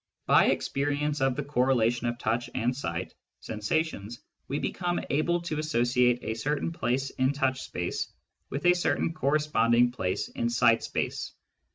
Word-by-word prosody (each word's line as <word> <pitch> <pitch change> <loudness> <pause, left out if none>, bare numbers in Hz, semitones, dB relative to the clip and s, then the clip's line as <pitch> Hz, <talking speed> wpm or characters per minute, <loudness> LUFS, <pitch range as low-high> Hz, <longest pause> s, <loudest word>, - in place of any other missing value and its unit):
By - - +6
experience 145 +1 0
of 135 -1 +2
the 150 - -2
correlation 125 -3 +1
of 120 0 -2
touch 120 +1 -1
and 125 0 0
sight 90 -9 -4 0.3
sensations, 115 0 -2 0.3
we 140 - -2
become 175 +3 -1
able 170 +4 +2
to 155 -3 -3
associate 125 -4 +2
a 110 - -2
certain 145 +7 -1
place 135 -3 -1
in 130 +2 +1
touch 130 -2 0
space 90 0 -3 0.4
with 140 - -4
a 175 - +7
certain 175 -1 0
corresponding 130 -6 +2
place 95 -7 -2
in 120 - -2
sight 120 -1 +4
space. - - -3
130 Hz, 150 wpm, -28 LUFS, 120-150 Hz, 0.4 s, a